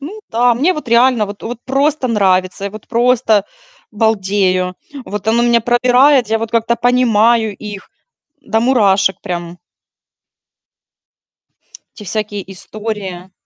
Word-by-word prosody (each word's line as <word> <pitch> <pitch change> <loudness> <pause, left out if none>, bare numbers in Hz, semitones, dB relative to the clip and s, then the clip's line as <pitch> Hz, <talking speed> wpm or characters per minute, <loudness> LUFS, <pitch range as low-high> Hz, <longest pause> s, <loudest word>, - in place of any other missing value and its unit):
Ну 340 +10 -8
да, 240 +1 +2
мне 295 +10 +1
вот 305 -7 -7
реально 235 -1 +3
вот 205 0 -10
вот 240 0 -6
просто 275 0 0
нравится. 190 -3 +1
Я 200 - -3
вот, 215 +1 -12
просто, 235 -3 +2 0.5
балдею, 195 -4 0 0.3
вот, 210 +1 -5
оно 235 +2 +2
меня 235 -1 +3
пробирает. 250 +2 +3
Я 225 0 +1
вот 225 0 -5
как-то 235 0 0
понимаю 235 -3 +2
их, 205 -2 -9 0.5
м, - - -20
до 225 - +2
мурашек, 200 -6 +2
прям. 175 0 -6 2.4
Эти 210 - -11
всякие 210 0 -4
истории. 195 -1 -7
220 Hz, 130 wpm, -15 LUFS, 200-245 Hz, 2.4 s, реально